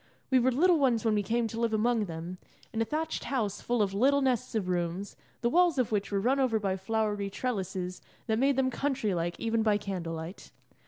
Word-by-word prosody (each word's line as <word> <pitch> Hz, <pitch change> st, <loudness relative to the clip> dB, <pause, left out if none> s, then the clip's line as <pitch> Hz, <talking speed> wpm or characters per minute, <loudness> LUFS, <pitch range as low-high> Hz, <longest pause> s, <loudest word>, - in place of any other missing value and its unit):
We 260 Hz, -, +6 dB
were 255 Hz, +2 st, +3 dB
little 335 Hz, +6 st, +4 dB
ones 240 Hz, -5 st, +2 dB
when 220 Hz, -, +3 dB
we 210 Hz, -, +2 dB
came 230 Hz, +3 st, 0 dB
to 225 Hz, +1 st, -6 dB
live 230 Hz, -2 st, +1 dB
among 225 Hz, 0 st, +2 dB
them, 170 Hz, +1 st, -6 dB, 0.3 s
in 225 Hz, -, -1 dB
a -, -, +2 dB
thatched 315 Hz, +6 st, -3 dB
house 220 Hz, -7 st, -1 dB
full 240 Hz, -3 st, +1 dB
of 195 Hz, -1 st, -2 dB
little 275 Hz, +7 st, +3 dB
nests 255 Hz, -2 st, 0 dB
of 205 Hz, -4 st, 0 dB
rooms, 180 Hz, +2 st, -2 dB, 0.3 s
the 235 Hz, -, +2 dB
walls 350 Hz, -2 st, +4 dB
of 250 Hz, -4 st, +1 dB
which 205 Hz, -1 st, -1 dB
were 200 Hz, -, +1 dB
run 255 Hz, +7 st, +2 dB
over 245 Hz, -5 st, +2 dB
by 195 Hz, -2 st, 0 dB
flowery 205 Hz, 0 st, -1 dB
trellises 190 Hz, -5 st, -3 dB, 0.2 s
that 220 Hz, 0 st, 0 dB
made 275 Hz, +1 st, +3 dB
them 260 Hz, 0 st, +1 dB
country 260 Hz, -6 st, -1 dB
like 175 Hz, 0 st, -2 dB
even 230 Hz, 0 st, 0 dB
by 215 Hz, -2 st, +3 dB
candle 185 Hz, -5 st, -4 dB
light. 165 Hz, +4 st, -8 dB
220 Hz, 220 wpm, -29 LUFS, 195-255 Hz, 0.3 s, We